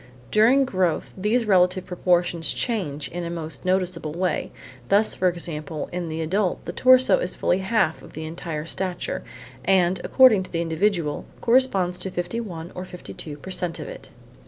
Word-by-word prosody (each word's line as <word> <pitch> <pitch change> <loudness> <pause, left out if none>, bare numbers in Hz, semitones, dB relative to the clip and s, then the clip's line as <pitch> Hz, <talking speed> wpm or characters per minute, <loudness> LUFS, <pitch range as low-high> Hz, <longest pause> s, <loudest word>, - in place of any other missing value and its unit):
During 245 +6 +5
growth 185 -8 0
these 215 +5 +1
relative 185 -2 +3
proportions 175 -2 +1
change 175 - -2
in 175 +1 -5
a 170 - -4
most 165 0 -5
noticeable 185 -4 0
way; 180 -1 -1 0.4
thus, 205 +2 +4
for 185 - +1
example, 155 -3 -5
in 175 -1 -3
the 160 +1 -3
adult 185 +4 -1
the - - -3
torso 255 -2 +5
is 180 - -2
fully 180 - +1
half 190 -5 +1
of - - -14
the 160 - -6
entire 160 -1 -5
stature 180 +1 -3 0.4
and, 185 -1 +3
according 255 -7 +6
to 185 - -9
the 170 - -1
individual, 165 -2 0
corresponds 215 -8 +2
to 190 - -2
51 175 -2 -4
or 180 - -6
52 175 -4 -8
per 190 +6 -9
cent 175 -2 -2
of - - -6
it. - - -8
180 Hz, 165 wpm, -24 LUFS, 165-195 Hz, 0.4 s, according